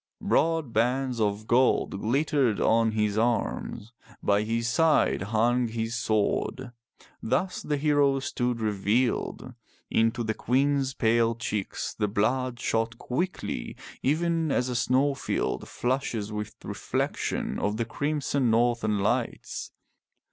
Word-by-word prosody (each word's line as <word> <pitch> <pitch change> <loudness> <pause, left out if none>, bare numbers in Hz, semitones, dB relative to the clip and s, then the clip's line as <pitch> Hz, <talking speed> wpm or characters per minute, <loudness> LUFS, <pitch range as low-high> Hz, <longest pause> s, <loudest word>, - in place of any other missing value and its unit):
Broad 160 -6 +1
bands 125 +2 +1
of 105 0 0
gold 120 -4 +2
glittered 135 -1 +1
on 115 -1 +3
his 105 -1 +1
arms. 115 -1 -1 0.3
By 100 +1 +3
his 115 +2 -1
side 155 +2 +3
hung 115 +4 +1
his 115 0 -3
sword. 115 +3 -1 0.5
Thus 160 +11 -1
the 150 - -1
hero 145 -2 +3
stood 125 -3 -2
revealed! 110 +4 0 0.4
Into 115 +2 +2
the 110 -1 -1
Queen's 135 +3 +1
pale 115 0 +2
cheeks 105 -3 -3
the 105 - -1
blood 120 +5 0
shot 115 -1 -1
quickly, 130 - -3 0.2
even 165 +2 +1
as 125 -1 +1
a 125 - -2
snow 130 +4 +2
field 135 - -2
flushes 120 -4 -2
with 105 -1 -5
reflection - - -2
of 105 +1 -1
the 115 - -1
crimson 145 -1 -1
Northern 115 -2 +2
Lights. 100 +1 -2
120 Hz, 120 wpm, -27 LUFS, 110-135 Hz, 0.5 s, on